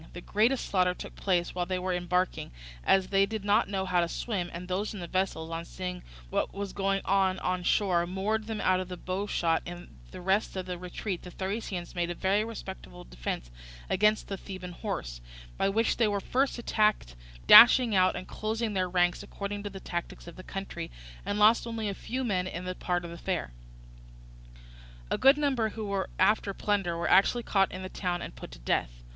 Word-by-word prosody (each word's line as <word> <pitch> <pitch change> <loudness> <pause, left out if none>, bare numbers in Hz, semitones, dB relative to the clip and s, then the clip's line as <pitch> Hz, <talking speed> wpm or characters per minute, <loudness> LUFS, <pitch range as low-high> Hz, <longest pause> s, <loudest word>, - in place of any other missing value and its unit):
The 175 - -7
greatest 225 +8 +1
slaughter 180 -2 +2
took - - -9
place 180 -3 0
while 180 -1 -2
they 185 - -1
were 185 0 -1
embarking, 180 +1 -1 0.3
as 190 - +3
they 195 0 +3
did 220 -2 -5
not 210 +1 +3
know 190 -1 -1
how 180 -1 +2
to 170 - +1
swim, 190 -5 -2
and 175 +1 -7
those 200 +4 -2
in - - -6
the 175 - -5
vessels 170 -3 -2
on 165 0 -3
seeing 180 +1 -6 0.3
what - - -1
was 200 -1 -4
going 195 0 0
on 190 -1 +2
on 185 -1 -1
on - - -9
shore 175 -2 +2
moored 210 +4 -1
them 220 -2 -3
out 185 0 +3
of 185 -1 -5 0.2
bowshot: 185 -3 0
in 175 - -10
the - - -9
rest 195 +4 0
of 185 -1 -3
the 180 -1 -5
retreat 180 +1 -4
the 180 - -9
Thracians 190 -1 -4
made 175 -1 -1
a 175 - -3
very 195 +4 +2
respectable - - -8
defence - - -5 0.4
against 210 +3 +3
the 195 - -4
Theban 185 -2 -8
horse, - - -5 0.3
by 195 - +1
which 225 +3 +1
they 230 - +3
were 205 -1 0
first 260 +8 0
attacked, 215 - +1 0.3
dashing 240 - +9
out 185 -1 +4
and 185 - -6
closing 220 0 -2
their 185 -2 0
ranks 175 -1 +2
according 205 0 -5
to 205 - -5
the 195 -1 -8
tactics 175 -2 -5
of 170 - -10
their - - -9
country, 195 +1 -6 0.4
and 205 - -1
lost 220 +3 +5
only 225 -2 -3
a 200 - -1
few 255 +6 -4
men 185 -6 0
in 180 0 -5
that 185 0 -5
part 175 -1 -1
of 170 - -7
the 170 - -8
affair. 180 - -2 1.6
A - - 0
good 270 +2 +6
number 265 -7 +1
who 220 0 -6
were 200 -1 -2
after 210 -2 +2
plunder 195 -5 0
were 170 - -1
actually 235 +5 +4
caught 195 -3 +2
in 185 +1 -6
the - - -4
town 180 -2 -3
and - - -8
put - - -9
to - - -11
death. - - -2
190 Hz, 210 wpm, -29 LUFS, 175-210 Hz, 1.6 s, dashing